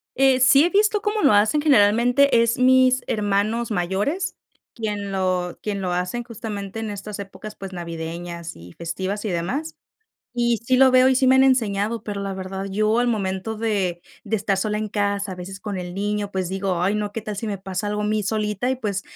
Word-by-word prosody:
Eh, 265 -1 +4
sí 275 +4 +6
he - - +2
visto 420 +2 +2
cómo 420 0 -1
lo 280 - +5
hacen. 215 +8 +3
Generalmente, 245 0 +4
es 235 0 0
mis 255 0 +4
hermanos 210 +2 0
mayores, 205 - -1 0.4
quien 210 -3 -4
lo 185 -2 -1
quien 200 -2 -3
lo 180 -1 -1
hacen 180 +7 -2
justamente 215 -3 -6
en 220 -1 -4
estas 205 +1 -7
épocas, 205 +2 -8
pues, 195 -1 -8
navideñas 170 0 -6
y 85 +1 -13
festivas 190 +5 -4
y 215 - -2
demás, 250 - -3 0.6
y 240 -1 +1
sí 245 +3 +1
lo 265 0 +6
veo 255 0 +6
y 265 - +3
sí 260 - +3
me 260 - +6
han 265 - +6
enseñado, 225 -4 +1
pero 205 -1 -4
la 195 0 -3
verdad 190 +1 -5
yo 215 +3 +1
al 245 0 +2
momento 205 0 -2
de 195 -6 -1 0.2
de 220 0 0
estar 200 -1 0
sola 210 +1 -1
en 215 0 -3
casa, 200 -1 -1
a - - -5
veces 185 +2 -8
con 205 -2 -4
el 180 -1 -6
niño, 205 +1 -2
pues, 190 -3 -2
digo: 190 -2 -1
"Ay 195 +3 +2
no, 210 -1 -2
¿qué 225 - -5
tal 215 -1 -5
si 225 - -4
me 205 -2 -2
pasa 190 +1 -4
algo 210 0 -2
a - - -1
mí 215 0 0
solita?", 210 +2 -1
y 260 - 0
pues, 205 -5 -3
210 Hz, 215 wpm, -22 LUFS, 190-235 Hz, 0.6 s, sí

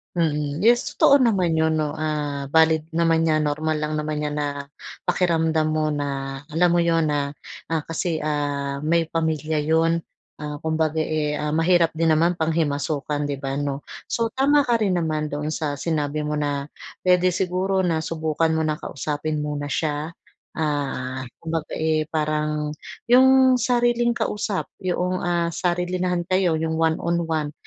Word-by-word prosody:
Mm. 150 -3 0
Yes, 235 +5 +3
totoo 280 - +5
naman 185 -8 +2
yun, 160 0 +2
'no, 150 -1 -2
ah, 150 -2 -2
valid 160 0 +4
naman 165 0 +2
'yan, 155 -2 +2
normal 155 +1 -1
lang 150 0 -2
naman 150 0 -2
'yan, 150 0 -2
na 145 -1 -3 0.4
pakiramdam 160 -3 +1
mo, 155 0 +1
na 140 -2 -3
alam 170 +4 +3
mo 175 0 +3
yun 165 -1 +2
na, 145 -1 -1 0.4
ah, 165 - +2
kasi 165 0 -2
ah, 145 -2 -2
may 165 +1 +2
pamilya 160 -2 -1
yun 165 +2 +2 0.3
ah, 150 -1 -6
kumbaga 160 0 0
eh, 155 -1 -1
ah, 150 +1 -1
mahirap 165 0 +3
din 165 0 +2
naman 165 +3 +3
panghimasukan, 150 -2 -1
'di 145 -1 -3
ba, 135 0 -3
'no. 140 0 -3 0.2
So 230 -1 +1
tama 280 +1 +3
ka 240 - +3
rin 185 -3 +1
naman 155 -2 -2
doon 145 +1 -3
sa 155 -2 -2
sinabi 150 -2 -1
mo 150 - -1
na, 145 -1 -2 0.4
puwede 180 0 +4
siguro 185 +2 0
na 165 -4 +1
subukan 160 0 0
mo 160 -1 0
na 155 - 0
kausapin 150 +1 -3
muna 145 -1 -3
siya. 150 +1 -1 0.4
Ah, 135 -4 -2 0.2
kumbaga 160 -1 -4
eh, 155 -1 +1
parang, 150 -1 -1 0.3
yung 260 +1 +6
sariling 240 -1 +2
kausap 205 -2 -2 0.2
yoong, 180 0 -1
ah, 175 -1 +1
sarilinahan 180 0 -1
kayo 185 -3 +2
yung 160 0 -1
one-one-one, 160 -1 0
160 Hz, 155 wpm, -23 LUFS, 150-170 Hz, 0.4 s, yung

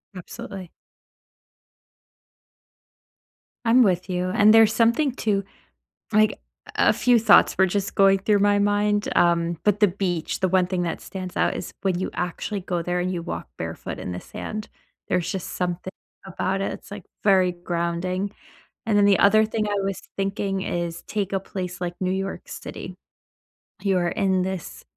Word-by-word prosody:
Absolutely. 190 -1 -8 2.9
I'm 240 +2 +6
with 185 -1 +1
you. 180 0 -1
And 210 +3 +5
there's 225 -1 +6
something 235 +5 +3
to 200 -5 0 0.7
like, 215 0 +4
a - - -10 0.5
a - - +6
few 245 -2 +4
thoughts 215 -2 +5
were 190 - +5
just 195 +1 -2
going 195 0 +5
through 205 0 +2
my 205 0 +3
mind. 205 0 +1
Um, 170 -1 +2
but 210 0 +2
the 210 - +7
beach, 180 -3 -2
the 185 - +2
one 185 0 +3
thing 180 -1 -2
that 165 - -3
stands 185 -1 -7
out - - +2
is - - -6
when 185 -3 0
you 185 - -2
actually 180 +3 -3
go 175 -1 -2
there, 175 +1 -1
and 185 +1 -1
you 175 - -2
walk 85 - -6
barefoot - - -5
in 90 - -5
the 90 - -5
sand, 215 0 -6 0.4
there's 175 -2 0
just 190 -4 -4
something 180 +1 -3 0.3
about 190 +1 -2
it. - - -2
It's, - - -11
like, 205 -3 -8 0.2
very 185 -3 +4
grounding. 175 +2 -2 0.6
And 215 -2 +2
then 200 - +5
the 200 -2 +5
other 215 +2 +5
thing 215 -1 -2
I 205 - -1
was 195 -1 -3 0.2
thinking 195 -1 -2
is, 170 -2 -3
take 200 -3 -2
a - - +2
place 180 -2 -6
like 175 0 -3
New 185 -1 0
York 195 +1 -3
City- - - -8 0.9
you 195 -2 +1
are 175 -1 +1
in 190 -1 +1
this 185 -3 -5
190 Hz, 170 wpm, -24 LUFS, 180-205 Hz, 2.9 s, the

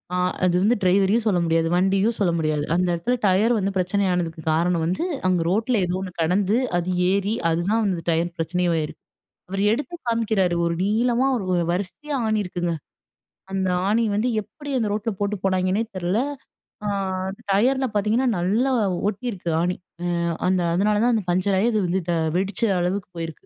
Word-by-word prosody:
அ - - +1 0.3
அது 180 -1 +3
வந்து 215 +5 +3
ட்ரைவரையும் 195 +4 +3
சொல்ல 195 -5 +2
முடியாது. 165 0 +2
வண்டியும் 195 +5 +2
சொல்ல 185 -4 +2
முடியாது. 155 -2 0
அந்த 180 +1 +2
இடத்துல 170 +9 0
டயர் 205 +5 +3
வந்து 200 -1 0
பிரச்சனை 185 +3 +1
ஆனதுக்கு 170 -3 -2
காரணம் 170 +1 +1
வந்து 185 - -1 0.2
அங்க 180 -2 +2
ரோட்டில 220 +5 +1
ஏதோ 175 +1 -2
ஒண்ணு 190 -1 -5
கெடந்து, 190 +6 +2 0.2
அது 175 +1 -2 0.2
ஏறி 200 +2 +1 0.2
அதுதான் 185 +7 +1
வந்து 175 -4 -1
டயர் 170 +1 +1
பிரச்சனையும் 170 +1 0
ஆயிருக்கு. 155 -2 -4 0.5
அவர் 195 +1 -1
எடுத்து 290 +9 -3
காமிக்கிறாரு. 220 -6 +1
ஒரு 170 - 0
நீளமா 235 +5 +2
ஒரு 185 -5 0
வரிசையா 240 +11 -3
ஆணி 220 -1 +1
இருக்குங்க. 175 -2 -2 0.8
அந்த 190 -1 0 0.2
ஆணி 225 +3 +2
வந்து 215 +4 +1
எப்படி 290 +6 -10
அந்த 220 -3 0
ரோட்ல 215 +2 -1
போட்டு 205 +1 0
போனாங்கன்னே 185 +2 +1
தெர்ல. 185 +2 -1 0.7
ஆ - - -1 0.4
அந்த 200 +3 -8
டயர்ல 260 +6 +2
பார்த்தீங்கன்னா, 220 +5 +2
நல்லா 225 +10 +1 0.4
ஒட்டியிருக்கு 200 -5 -4
ஆணி. 180 +1 0 0.4
அ - - -1 0.3
அந்த 185 -1 +2
அதனால 205 +3 +2
தான் 245 0 +3
அந்த 210 - -1
பங்சர் 185 +2 +1
ஆயி 230 - +3
அது 215 - +2
வந்து 185 +2 0
த - - +1 0.2
வெடிச்ச 195 +3 -1 0.2
அளவுக்கு 185 +2 -2
போயிருக்கு. 165 -1 -6
190 Hz, 170 wpm, -23 LUFS, 175-215 Hz, 0.8 s, அது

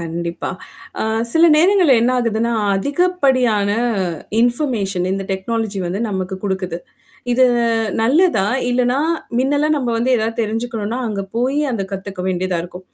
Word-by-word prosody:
கண்டிப்பா. 170 +1 -4 0.5
அ - - +1 0.3
சில 325 +1 +5
நேரங்கள்ல 355 -3 +5
என்ன 245 - +2
ஆகுதுன்னா, 230 0 0 0.2
அதிகப்படியான 260 - +1 0.7
இன்ஃபர்மேஷன் 230 -8 0
இந்த 195 0 -3
டெக்னாலஜி 210 +1 -2
வந்து 185 +4 -3
நமக்கு 190 -1 -3
குடுக்குது. 190 -3 -2 0.5
இது 255 +1 +4 0.6
நல்லதா? 265 - +3 0.2
இல்லன்னா, 250 +2 +1 0.4
மின்னலாம் 290 +3 +1
நம்ம 255 -4 -2
வந்து 250 +3 0
ஏதாவது 225 +1 -2
தெரிஞ்சுக்கணும்னா, 225 +1 -3
அங்க 200 -2 -3
போய் 265 +5 +1
அந்த 200 -4 -2
கத்துக்க 195 -1 -5
வேண்டியதா 185 -1 -1
இருக்கும். 180 +1 -11
225 Hz, 125 wpm, -18 LUFS, 195-260 Hz, 0.7 s, சில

